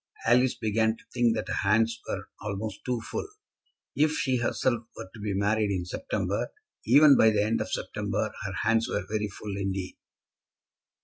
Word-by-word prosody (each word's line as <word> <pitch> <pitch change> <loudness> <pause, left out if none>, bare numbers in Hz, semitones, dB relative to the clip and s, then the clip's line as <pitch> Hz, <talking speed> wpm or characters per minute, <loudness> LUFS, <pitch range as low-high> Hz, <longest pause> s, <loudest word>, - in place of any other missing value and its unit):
Alice 125 +2 +4
began 110 +1 +1
to - - -19
think 120 -2 +3
that - - -3
her - - -2
hands 115 +3 +2
were - - -4
almost 105 0 -4
too 125 -2 -1
full. 115 - -4 0.7
If 155 +1 +3
she 130 -4 +1
herself 120 0 0 0.2
were - - -7
to 115 - -11
be 100 -1 -2
married 105 +1 +1
in 95 -3 -1
September, 90 - -2 0.4
even 140 +4 +8
by 110 - +6
the 105 -1 +2
end 110 +2 0
of - - -4
September, - - -2
her - - -4
hands 115 0 +2
were 90 - -2
very 105 0 -1
full 100 0 -7
indeed. 95 -1 -3
110 Hz, 175 wpm, -28 LUFS, 100-120 Hz, 0.7 s, even